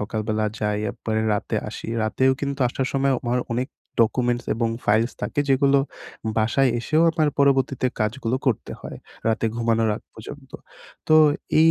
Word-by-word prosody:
সকালবেলা 110 Hz, 0 st, -2 dB
যাই 105 Hz, -1 st, -1 dB
একবারে 110 Hz, -1 st, -2 dB
রাতে 105 Hz, -, -1 dB
আসি। -, -, -8 dB, 0.2 s
রাতেও 130 Hz, +5 st, +2 dB
কিন্তু 140 Hz, 0 st, -3 dB
আসার 130 Hz, +1 st, -2 dB
সময়ও 135 Hz, -1 st, +2 dB
আমার 125 Hz, +1 st, +1 dB
অনেক 125 Hz, +3 st, -1 dB, 0.3 s
ডকুমেন্টস 120 Hz, +1 st, +1 dB
এবং 115 Hz, 0 st, 0 dB, 0.2 s
ফাইলস 110 Hz, +3 st, +2 dB
থাকে 145 Hz, -, -1 dB
যেগুলো 140 Hz, +1 st, +4 dB, 0.6 s
বাসায় 120 Hz, +4 st, +3 dB
এসেও 155 Hz, +6 st, +2 dB
আমার 155 Hz, -2 st, +1 dB
পরবর্তীতে 135 Hz, -2 st, +2 dB
কাজগুলো 115 Hz, +3 st, 0 dB
করতে 120 Hz, -, 0 dB
হয়। -, -, -8 dB, 0.3 s
রাতে 110 Hz, 0 st, +1 dB
ঘুমানোর 115 Hz, -1 st, +1 dB
আগ -, -, -12 dB
পর্যন্ত। 135 Hz, +4 st, -10 dB, 0.6 s
তো 155 Hz, -, +7 dB, 0.4 s
এই 165 Hz, 0 st, +7 dB
120 Hz, 150 wpm, -23 LUFS, 110-135 Hz, 0.6 s, তো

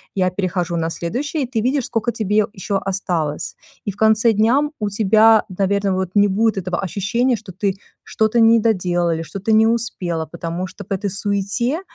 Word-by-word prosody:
я 185 Hz, -2 st, +2 dB
перехожу 180 Hz, -2 st, -2 dB
на 165 Hz, 0 st, -1 dB
следующее. 265 Hz, -, -3 dB
И -, -, -3 dB
ты 240 Hz, -3 st, -2 dB
видишь, 260 Hz, +1 st, 0 dB
скока 230 Hz, +1 st, -1 dB
тебе 210 Hz, 0 st, +1 dB
еще 195 Hz, +1 st, -2 dB
осталось. 175 Hz, -6 st, -3 dB, 0.3 s
И 200 Hz, -, -2 dB
в 195 Hz, -, -17 dB
конце 220 Hz, +1 st, +4 dB
дня 225 Hz, +7 st, +3 dB, 0.2 s
у 210 Hz, -, -1 dB
тебя, 215 Hz, +2 st, +4 dB
наверно, 195 Hz, +1 st, 0 dB
вот, 185 Hz, -1 st, -2 dB
не 205 Hz, 0 st, +5 dB
будет 215 Hz, +2 st, +1 dB
этого 180 Hz, -2 st, -2 dB
ощущения, 210 Hz, +7 st, 0 dB
что 215 Hz, -3 st, -10 dB
ты 195 Hz, +1 st, -1 dB, 0.3 s
что-то 220 Hz, +2 st, 0 dB
не 230 Hz, 0 st, +6 dB
доделала 180 Hz, -6 st, +1 dB
или 160 Hz, -, -3 dB
что-то 195 Hz, +6 st, -4 dB
не 220 Hz, +1 st, +5 dB
успела, 185 Hz, -8 st, -1 dB
потому 170 Hz, +2 st, -5 dB
что 205 Hz, -, -11 dB
в -, -, -25 dB
этой 200 Hz, +1 st, -1 dB
суете, 205 Hz, -, -1 dB
200 Hz, 185 wpm, -20 LUFS, 185-225 Hz, 0.3 s, не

